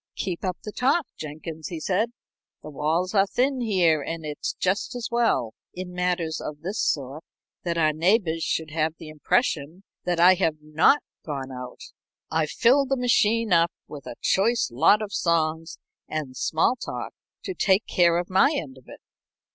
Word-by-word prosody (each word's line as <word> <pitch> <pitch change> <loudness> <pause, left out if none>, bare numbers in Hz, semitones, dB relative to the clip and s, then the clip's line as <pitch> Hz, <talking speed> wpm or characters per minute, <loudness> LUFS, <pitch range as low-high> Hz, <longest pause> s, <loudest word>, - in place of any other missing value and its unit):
"Keep 180 -3 -4
up 185 -2 -2
the 210 - -6
talk, 275 +8 +1
Jenkins," 155 +1 -7
he 170 - -5
said. 205 +8 0 0.5
"The 155 - -8
walls 160 +6 -1
are 200 -1 +4
thin 260 +4 0
here, 180 -9 +2
and 165 +2 -5
it's 150 -1 -3
just 190 +6 -1
as 240 -2 -4
well, 230 - +1 0.2
in 180 0 -6
matters 180 -3 -1
of 150 0 -7
this 190 +6 -4
sort, 140 +2 -2 0.4
that 170 -1 -2
our 155 -2 +3
neighbors 165 0 +2
should 160 -1 -2
have 160 0 0
the 160 - -10
impression 160 - -1 0.2
that 175 -1 0
I 180 +2 +8
have 175 -4 0
not 155 - +3 0.2
gone 135 -3 -5
out. 125 -1 -8 0.5
I've 160 -1 +1
filled 265 +3 +3
the 270 - +1
machine 230 -3 +2
up 170 0 +4 0.2
with 145 -2 -10
a - - -6
choice 225 - +2
lot 165 - +4
of 205 - -7
songs 165 -1 0 0.3
and 150 -5 -4
small 160 - +1
talk - - -6 0.3
to 380 - -4
take 200 - +2
care 170 -1 +3
of 175 0 -2
my 195 +11 +4
end 130 - -5
of 130 - -24
it. - - -12
170 Hz, 175 wpm, -25 LUFS, 155-205 Hz, 0.5 s, I